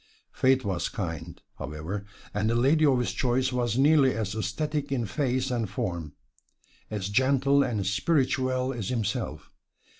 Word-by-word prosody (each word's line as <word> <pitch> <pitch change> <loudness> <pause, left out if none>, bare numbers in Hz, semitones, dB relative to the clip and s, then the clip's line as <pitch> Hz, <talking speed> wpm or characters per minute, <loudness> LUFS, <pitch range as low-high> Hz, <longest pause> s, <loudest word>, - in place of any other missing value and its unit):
Fate 130 -2 +2
was 90 -4 -1
kind, 85 -3 -5 0.2
however, 80 +8 -5 0.3
and 105 +2 0
the 115 - +1
lady 145 +6 +4
of 135 -2 +4
his 125 - 0
choice 130 +1 0
was 120 -2 0
nearly 140 -1 +5
as 105 -3 -2
esthetic 140 +8 -2
in 125 -4 0
face 130 +5 -1
and 115 -5 -1
form, 85 -6 -3 0.8
as 105 -3 -3
gentle 135 +5 +3
and 110 -7 -1
spirituelle 130 - +1
as 110 -6 -4
himself. 115 -5 -3
120 Hz, 145 wpm, -27 LUFS, 100-130 Hz, 0.8 s, nearly